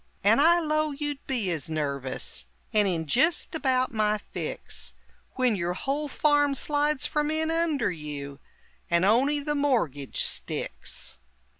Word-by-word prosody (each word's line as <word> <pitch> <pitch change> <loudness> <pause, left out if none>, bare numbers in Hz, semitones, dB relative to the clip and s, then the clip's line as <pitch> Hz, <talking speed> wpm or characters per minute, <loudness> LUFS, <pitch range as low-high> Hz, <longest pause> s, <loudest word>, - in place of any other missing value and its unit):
And 220 +7 +5
I 340 +3 +6
'low 310 -1 +1
you'd 290 -1 -4
be 230 -9 0
as 160 -3 -3
nervous, 140 - -3 0.3
And 210 -2 +4
in 165 -3 -1
jist 285 - +2
about 255 -5 +1
my 215 -1 +2
fix, 210 - -5 0.4
When 250 -4 +2
yer 175 -1 -1
whole 280 +9 -2
farm 290 0 +2
slides 295 +1 +1
from 300 0 0
inunder 315 - +1
you, 145 -2 -6 0.5
And 170 +2 +3
on'y 270 +8 +3
the 295 +1 -1
mor'gage 230 - 0
sticks! - - -3
255 Hz, 135 wpm, -27 LUFS, -, 0.5 s, I